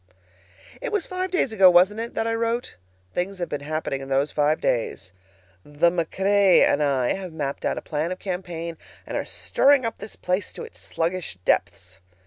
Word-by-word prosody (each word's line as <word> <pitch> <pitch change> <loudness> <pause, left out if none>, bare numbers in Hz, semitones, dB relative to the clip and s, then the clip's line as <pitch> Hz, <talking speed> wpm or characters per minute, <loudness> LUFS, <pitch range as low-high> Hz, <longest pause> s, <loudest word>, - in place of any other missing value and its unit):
It - - -3
was 415 -5 0
five 370 0 -3
days 350 -10 0
ago, 195 -3 +7
wasn't 185 +5 +5
it, 230 +1 -5
that - - 0
I 225 - 0
wrote? 230 +1 -1 0.4
Things 190 +2 -2
have 175 -1 -3
been 145 - -3
happening 150 -2 -3
in 135 - -8
those 135 +2 +1
five 150 +1 +2
days. 100 -5 -1 0.5
The 150 +4 +2
MacRae 190 +3 +3
and 145 - +3
I 135 -4 +2
have 185 -2 -6
mapped 145 -3 -4
out - - 0
a - - -5
plan 155 +3 -2
of 185 - -3
campaign, 175 -4 -5 0.3
and - - -6
are - - 0
stirring 275 -2 +2
up 230 - -3
this 215 - -7
place 185 +3 -2
to - - -7
its 460 - -11
sluggish 170 - -3
depths. 95 +2 0
175 Hz, 190 wpm, -24 LUFS, 150-210 Hz, 0.5 s, ago